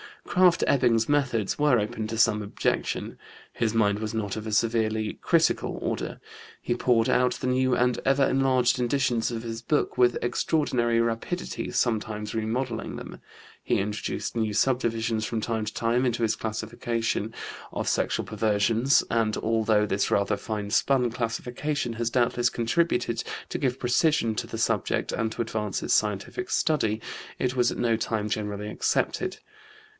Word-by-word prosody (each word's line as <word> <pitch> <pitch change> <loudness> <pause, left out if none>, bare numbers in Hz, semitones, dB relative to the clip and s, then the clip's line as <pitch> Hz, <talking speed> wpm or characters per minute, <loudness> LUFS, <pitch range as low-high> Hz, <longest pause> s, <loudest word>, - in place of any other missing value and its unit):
Krafft 180 -2 +4
Ebing's 115 -4 +3
methods 130 -8 +1
were 145 -4 +4
open 110 0 -2
to 110 +1 -4
some 110 -1 +3
objection. 105 - -2 0.3
His 110 -1 0
mind 105 -2 +2
was 110 0 -4
not 105 -3 -2
of 110 0 -5
a - - -3
severely 110 -1 0
critical - - +2
order. - - -3 0.4
He 120 - -1
poured 120 -2 +2
out 125 0 +3
the 130 - -4
new 130 0 +2
and 125 0 +1
ever 135 +1 +3
enlarged 130 -2 +2
editions 120 -2 +1
of 115 -1 -4
his 115 -1 -5
book 145 +3 0
with 120 -1 +4
extraordinary 120 -3 +1
rapidity, 115 +10 -3
sometimes 105 -2 -1
remodelling 115 +2 -2
them. - - -8 0.4
He - - +1
introduced 105 +4 -3
new 110 -2 0
subdivisions 115 -1 +1
from 115 -1 -2
time 110 -1 -2
to - - -5
time 120 +3 +1
into 120 -1 0
his 110 - +2
classification 115 0 -2 0.4
of - - -3
sexual - - 0
perversions, 110 +4 +2
and, 115 -2 +1
although 110 -1 +2
this 100 -1 0
rather 100 0 +1
fine 105 -2 -4
spun 125 0 +2
classification 120 +3 -2
has 115 0 -1
doubtless 120 0 +2
contributed 120 0 0 0.3
to - - -2
give 130 -2 -1
precision 125 -1 +2
to - - -3
the - - -6
subject - - 0
and 110 -1 -1
to - - -3
advance 110 -3 -2
its - - +1
scientific 105 - -1
study, 110 -9 +1 0.4
it 125 0 -1
was 120 -1 +3
at - - -5
no 115 -2 +2
time 110 -1 -2
generally 105 -1 -3
accepted. - - -1
115 Hz, 155 wpm, -26 LUFS, 110-125 Hz, 0.4 s, Krafft